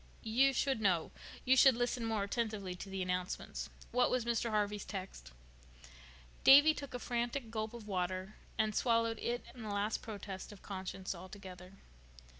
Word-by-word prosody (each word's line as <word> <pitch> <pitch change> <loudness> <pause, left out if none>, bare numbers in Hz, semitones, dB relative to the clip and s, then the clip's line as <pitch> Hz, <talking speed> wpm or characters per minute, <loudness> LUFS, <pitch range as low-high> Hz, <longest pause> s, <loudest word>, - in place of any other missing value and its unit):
"You 250 +5 +4
should 265 -2 0
know. 180 -6 +2 0.3
You 260 +1 +6
should 265 -1 +7
listen 245 0 -1
more 220 -3 0
attentively 205 -3 -2
to 180 +2 -8
the 190 -1 -2
announcements. 180 0 -3 0.2
What 250 0 +3
was 250 -2 0
Mr. 235 0 0
Harvey's 210 -1 0
text?" 185 - -7 1.1
Davy 290 +3 +9
took 280 -4 -7
a - - 0
frantic 240 0 -2
gulp 220 0 -3
of 225 -3 -9
water 185 +1 -2 0.2
and 215 -1 +1
swallowed 230 0 +2
it 240 +1 -2
and 245 -3 -9
the 215 - -5
last 205 +1 -1
protest 200 -3 -7
of 205 - -13
conscience 190 -1 -5 0.2
together. 185 -1 -10
215 Hz, 160 wpm, -35 LUFS, 190-240 Hz, 1.1 s, Davy